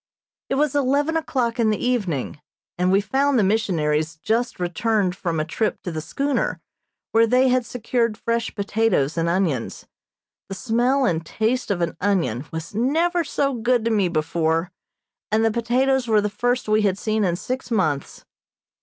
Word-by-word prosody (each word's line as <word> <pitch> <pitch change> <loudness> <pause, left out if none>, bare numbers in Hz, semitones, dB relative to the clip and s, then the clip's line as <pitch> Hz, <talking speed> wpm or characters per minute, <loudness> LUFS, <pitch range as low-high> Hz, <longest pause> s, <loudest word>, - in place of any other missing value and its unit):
It - - 0
was 295 0 +1
eleven 285 +3 +1
o'clock 250 -7 -1
in 225 -2 +3
the 215 - +1
evening, 190 - -2 0.3
and 180 +1 +1
we 195 +1 +4
found 270 +6 +1
the 215 - +4
missionaries 165 -7 0
just 225 +8 -1
returned 185 +2 0
from 170 -3 -2
a 155 - 0
trip 210 +6 -1
to 175 - -4
the 160 -1 -4
schooner, 280 - -1 0.5
where 230 +1 +4
they 255 +3 +4
had 250 -1 +1
secured 230 -2 -1
fresh 230 0 -2
potatoes 200 -8 +1
and 165 0 0
onions. 170 -9 -1 0.6
The 195 - -4
smell 250 +6 +1
and 165 -7 0
taste 225 +9 -1
of 190 -4 -1
an 170 - -2
onion 165 - 0
was 160 +2 -6
never 325 - +1
so 275 -3 -1
good 240 -1 +1
to 230 - +1
me 205 -4 +2
before, 165 +1 0 0.6
and 220 +1 +3
the 225 - +3
potatoes 250 +3 +1
were 220 -2 +4
the 210 0 0
first 245 +3 -1
we 215 0 +3
had 195 -2 +1
seen 215 +1 0
in 175 -3 +1
six 255 +9 -5
months. 155 - -1
220 Hz, 170 wpm, -22 LUFS, 175-250 Hz, 0.6 s, we